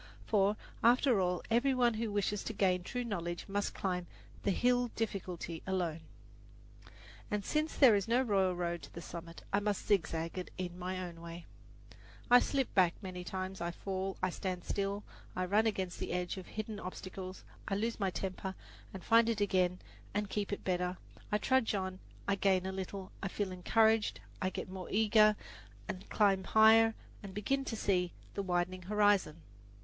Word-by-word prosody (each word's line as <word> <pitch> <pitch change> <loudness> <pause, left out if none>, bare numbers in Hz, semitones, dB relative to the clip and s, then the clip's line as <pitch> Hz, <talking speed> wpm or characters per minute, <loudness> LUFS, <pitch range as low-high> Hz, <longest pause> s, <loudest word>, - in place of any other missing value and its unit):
For, 205 0 +3 0.3
after 245 -1 +5
all, 180 -1 0
every 260 +4 +3
one 240 -2 +4
who 220 0 -2
wishes 205 0 0
to 225 - -3
gain 185 -3 +2
true 245 +7 -3
knowledge 175 -6 -3
must 205 0 -2
climb 180 -2 -2 0.3
the - - 0
Hill 245 +5 +3
Difficulty 180 -6 -3
alone, 175 -4 -1 1.3
and 205 -2 -2
since 310 +1 0
there 260 -6 +7
is 200 -2 +1
no 240 +3 +3
royal 195 -6 +2
road 175 -1 -2
to - - -11
the - - -8
summit, 170 -1 -8
I 200 - +4
must 205 -1 -1
zigzag 165 -3 0
it 180 - -6
in 180 -1 -4
my 185 +1 -3
own 165 -1 -11
way. 170 0 -8 0.9
I 245 - +10
slip 270 0 0
back 180 -3 +4
many 180 -1 -5
times, 185 +1 -4
I 170 - -1
fall, 190 +2 -3
I 185 - +2
stand 185 -1 -3
still, 200 +1 -2 0.3
I 185 - 0
run 210 +4 +3
against 190 -4 -2
the - - -3
edge 180 +1 -1
of 185 - -8
hidden 215 -1 -5
obstacles, 185 0 -7 0.2
I 195 - 0
lose 230 +3 -1
my 195 -2 +1
temper 190 0 -4 0.4
and 190 -3 -8
find 230 0 +5
it 225 -2 0
again 185 -3 +2 0.4
and 210 -1 -1
keep 205 -1 -2
it 200 - -3
better, 180 0 0 0.3
I 210 - +3
trudge 260 0 +2
on, 185 -1 -3 0.3
I 200 - +3
gain 190 -2 +2
a 190 - -2
little, 190 0 -5
I - - -1
feel 195 0 -2
encouraged, 220 +4 +3 0.2
I 185 - +1
get - - -5
more 185 -1 -7
eager 215 0 +5 0.5
and 190 -2 -6
climb 195 -3 +3
higher 225 +1 +6 0.3
and 195 -3 -9
begin 270 +7 0
to 230 - -3
see 180 -4 +1 0.2
the 200 - -2
widening 185 0 -1
horizon. 200 -4 +2
195 Hz, 180 wpm, -34 LUFS, 180-215 Hz, 1.3 s, I